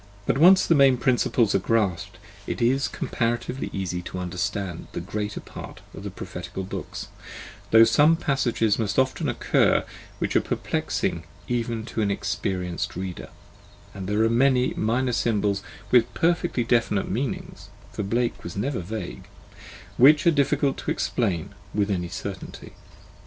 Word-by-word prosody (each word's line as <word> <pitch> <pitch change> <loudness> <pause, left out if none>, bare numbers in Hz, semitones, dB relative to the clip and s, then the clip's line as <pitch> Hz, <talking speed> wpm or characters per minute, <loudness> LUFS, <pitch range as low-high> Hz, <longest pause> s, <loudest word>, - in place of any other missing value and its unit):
But 135 - +1
when 160 - +7
once 190 +1 +7
the - - +4
main 135 -4 +5
principles 120 -3 +2
are - - +3
grasped, 100 -4 0 0.3
it - - -3
is 130 +3 +2
comparatively 120 +3 -2
easy 90 -2 -3
to 90 - -7
understand 90 0 -3
the - - -3
greater 105 +4 -4
part - - -10
of - - -9
the - - -5
prophetical 95 - -7
books, 95 - -6 0.6
though 115 0 +8 0.3
passages 120 -8 +1
must 105 -2 -1
often 130 +3 +1
occur 120 - +2 0.3
which - - -2
are - - +5
perplexing 85 0 -2 0.2
even 115 -2 -2
to 115 - -3
an 105 - +1
experienced 95 -3 -2
reader, 90 0 -5 0.6
and 95 0 -6
there 105 +2 +2
are - - +4
many 125 +2 +3
minor 125 +3 0
symbols 105 -4 +1 0.3
with 120 -2 +4
perfectly 170 -6 +1
definite 115 -4 +1
meanings 125 +5 -4 0.2
(for - - -4
Blake 115 +4 -1
was 85 - -7
never 130 +5 -1
vague), 90 - -6 0.7
which 145 +6 +6
are 170 - +6
difficult 140 -2 +1
to - - -5
explain 95 -9 -1 0.2
with 105 -1 +1
any 90 -3 -2
certainty. - - -7
115 Hz, 145 wpm, -25 LUFS, 95-130 Hz, 0.7 s, though